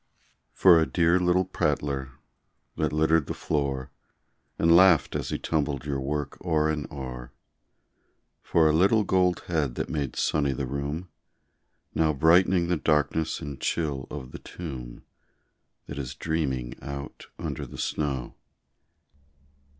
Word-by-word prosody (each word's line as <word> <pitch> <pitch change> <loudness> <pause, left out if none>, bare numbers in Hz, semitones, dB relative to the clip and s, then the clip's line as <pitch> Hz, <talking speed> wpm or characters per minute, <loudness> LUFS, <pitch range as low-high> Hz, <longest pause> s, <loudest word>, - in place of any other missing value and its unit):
For 90 -3 +6
a 80 - +2
dear 85 +1 +3
little 90 +1 +2
prattler 70 -6 -1 0.6
that - - 0
littered 80 0 +2
the - - -4
floor, 70 -4 -2 0.7
And 85 0 +5
laughed 90 -3 +5
as - - -2
he - - -1
tumbled 75 -3 -1
your 70 -2 -2
work 75 +2 -4
o'er 80 -3 +2
and 75 -3 -4
o'er 65 -3 -7 1.1
For 80 -2 +3
a 75 - +3
little 100 +7 +4
gold 90 -2 +2
head 75 -8 -1
that - - -3
made 70 -5 -2
sunny 70 -3 +1
the 65 +1 -3
room, 70 +7 -4 0.8
Now 80 -1 +2
bright'ning 85 +4 +4
the 90 0 +1
darkness 75 +1 0
and 70 -4 -7
chill 75 -5 -1
of 65 -4 -7
the - - -8
tomb, 65 -8 -8 0.8
That 70 - -7
is 65 -3 -5
dreaming 70 -7 -2
out 70 0 -7
under - - -5
the - - -10
snow. 70 -5 -2
75 Hz, 135 wpm, -27 LUFS, 70-85 Hz, 1.1 s, For